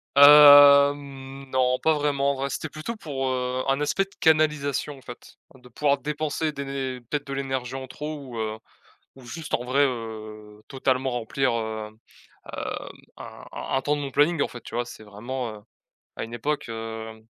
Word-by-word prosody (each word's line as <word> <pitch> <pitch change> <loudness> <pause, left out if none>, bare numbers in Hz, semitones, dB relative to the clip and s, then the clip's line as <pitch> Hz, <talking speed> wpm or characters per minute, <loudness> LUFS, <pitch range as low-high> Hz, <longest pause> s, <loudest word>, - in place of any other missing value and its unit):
Hem, 140 -1 +7
non, 130 -1 +2
pas 160 - +3
vraiment. 145 -2 +1
En - - -3
vrai, 135 +1 -3
c'était 155 - -4
plutôt 155 +10 -6
pour, 140 -10 -4
heu, 125 0 -2
un 135 +1 +1
aspect 150 +6 +1
de 195 - -24
canalisation, 150 -2 +1
en - - -16
fait, 120 -2 -12 0.2
hein, 130 - -18
de 125 0 -17
pouvoir 140 +3 +1
dépenser 150 +2 -2
des 140 -1 -6
né 135 -2 -4
peut-être 145 +4 -4
de 140 - -5
l'énergie 135 -2 -3
en 130 0 -6
trop 150 +4 -6
ou, 125 -5 -8
heu, 110 0 -3 0.6
ou 130 - -14
juste, 150 +6 -6
en 120 - -1
vrai, 135 +3 +2
heu, 110 -4 -6
totalement 130 -1 0
remplir, 120 +2 -1
heu, 110 -1 -3
hem, 110 +1 -21 1.2
un - - -11
un - - -4
un - - -1
temps 150 +2 0
de 145 - -4
mon 140 - -4
planning, 150 +3 +2
en - - +2
fait, 120 - -10
tu - - -12
vois? 120 0 -1
C'est 120 - -11
vraiment, 115 +4 -5
heu, - - -15 0.5
à - - -4
une 115 +1 -8
époque, 145 +3 -3
hem, 110 -1 -7
135 Hz, 195 wpm, -25 LUFS, 120-145 Hz, 1.2 s, Hem